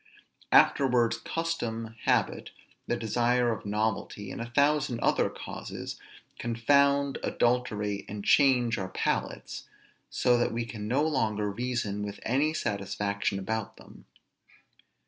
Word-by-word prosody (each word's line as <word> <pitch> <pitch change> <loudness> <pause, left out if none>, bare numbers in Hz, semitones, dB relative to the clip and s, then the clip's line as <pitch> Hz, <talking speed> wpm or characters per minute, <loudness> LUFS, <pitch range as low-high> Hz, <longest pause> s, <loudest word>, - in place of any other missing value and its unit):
Afterwards 120 -4 +4
custom, 115 -7 -3
habit, - - +1 0.4
the - - 0
desire 120 +2 +1
of 110 - -5
novelty, 105 -1 -2
and - - -6
a 115 - -5
thousand 140 -2 +2
other - - +2
causes, - - -7 0.4
confound, 140 +4 +2
adulterate, 105 -5 0
and 100 0 -6
change 125 -4 +4
our 95 -1 -4
palates, - - -3 0.4
so 125 -1 +2
that 120 - +1
we 115 0 -2
can 105 -2 -6
no 135 +6 +2
longer 110 -9 0
reason 115 -3 -2
with 105 0 -5
any 140 +6 +2
satisfaction 100 -5 -2
about 110 +2 -3
them. - - -15
115 Hz, 120 wpm, -28 LUFS, 105-125 Hz, 0.4 s, Afterwards